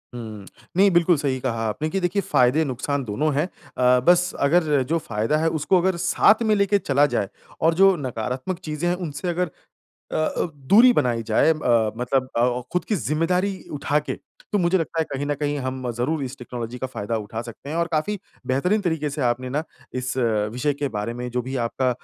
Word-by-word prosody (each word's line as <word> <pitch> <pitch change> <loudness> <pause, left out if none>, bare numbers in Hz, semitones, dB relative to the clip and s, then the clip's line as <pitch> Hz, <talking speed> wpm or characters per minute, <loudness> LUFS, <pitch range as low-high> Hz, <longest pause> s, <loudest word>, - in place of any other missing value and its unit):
हुँ। 110 -4 -7 0.3
नहीं 200 +1 +6
बिल्कुल 175 -1 +4
सही 135 -2 -1
कहा 115 -3 -2
आपने 150 +9 -2
कि 195 - -1
देखिए 185 +2 0
फ़ायदे 130 0 +3
नुकसान 140 +1 -2
दोनों 145 +8 0
है। 150 - +2
अ, 125 -8 +1
बस 180 +1 +5 0.2
अगर 150 -4 +3
जो 165 - +2
फ़ायदा 115 +7 0
है 160 +1 +1
उसको 155 +5 +2
अगर 190 +1 +1
साथ 190 +5 +4
में 215 -1 +3
लेके 200 0 +3
चला 140 -4 +3
जाए 100 - 0 0.3
और 165 +1 +4
जो 195 +2 +5
नकारात्मक 130 - -4
चीज़ें 155 +1 -2
हैं 175 - +1
उनसे 175 -1 -5
अगर 175 0 0 0.6
अ - - -3
अ, 155 - 0
दूरी 200 - +6
बनाई 120 - +1
जाए 110 +7 +4
अ, 115 -8 +2
मतलब 130 +2 0
अ - - +2
अ, 125 0 +1
खुद 180 +1 -1
की 215 - 0
ज़िम्मेदारी 165 - 0 0.2
उठा 145 +1 +1
के। 150 - -4 0.4
तो 210 - +2
मुझे 180 0 +3
लगता 165 -1 -2
है 160 - +2
कहीं 135 +1 -2
न 145 - 0
कहीं 145 -1 -1
हम 130 -1 -3
ज़रूर, 135 +6 -1
इस 130 +1 -6
टेक्नोलॉजी 120 -1 -6
का 130 - -3
फ़ायदा 115 -3 -4
उठा 110 +1 -5
सकते 120 +4 -10
हैं। 155 - -3
और 170 0 +1
काफ़ी 165 +7 0 0.3
बेहतरीन 180 +12 +1
तरीके 160 -5 -1
से 145 +1 -4
आपने 125 +1 0
ना 145 +4 -1 0.3
इस 130 0 -2 0.4
विषय 145 +5 0
के 145 0 -2
बारे 105 0 -3
में, 125 +1 -5
जो 125 +1 -1
भी 130 +2 -5
आपका 130 +2 0
145 Hz, 210 wpm, -23 LUFS, 125-170 Hz, 0.6 s, नहीं